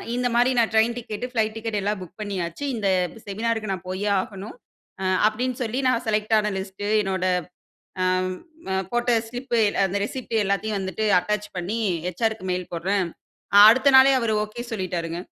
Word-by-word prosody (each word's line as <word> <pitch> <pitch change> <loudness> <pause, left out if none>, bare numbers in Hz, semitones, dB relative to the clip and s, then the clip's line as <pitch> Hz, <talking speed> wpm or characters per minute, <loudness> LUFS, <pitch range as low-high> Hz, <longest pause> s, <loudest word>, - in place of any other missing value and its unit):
இந்த 250 0 0
மாரி 245 +2 +4
நான் 230 -2 +2
ட்ரெயின் 225 +2 +3
டிக்கெட், 230 -1 -5
ஃப்ளைட் 220 -3 0
டிக்கெட் 225 -2 -3
எல்லாம் 205 0 -1
புக் 180 +3 -12
பண்ணியாச்சு 185 0 -4
இந்த 210 -3 -1 0.4
செமினாருக்கு 215 0 -2
நான் 185 -1 -7
போயே 195 +3 -2
ஆகணும். 195 +1 -8 0.5
அ - - -2 0.2
அப்டின்னு 245 +3 -2
சொல்லி 240 +3 -2
நான் 245 -2 +1
செலக்ட் 215 0 0
ஆன 210 0 +1
லிஸ்ட் 190 +1 -6 0.2
என்னோட 190 -2 -2 0.8
ஆம் 185 0 +1 0.4
அ - - +1 0.2
போட்ட 240 +1 +1 0.2
ஸ்லிப் 245 +1 -5 0.3
அந்த 195 +1 -1
ரிசிப்ட் 240 +1 -6
எல்லாத்தையும் 200 +2 -1
வந்துட்டு 190 +3 -3
அட்டாச் 210 +3 -2
பண்ணி 185 +6 -2 0.3
ஹெச்.ஆர்.க்கு 190 +2 -2
மெயில் 180 0 -4
போடுறேன் 185 +3 0 0.6
அடுத்த 260 +5 +5
நாளே 265 +1 +8
அவரு 230 -2 0
ஓகே 220 +3 -7
சொல்லிட்டாருங்க. 175 -5 -3
210 Hz, 160 wpm, -24 LUFS, 190-230 Hz, 0.8 s, நாளே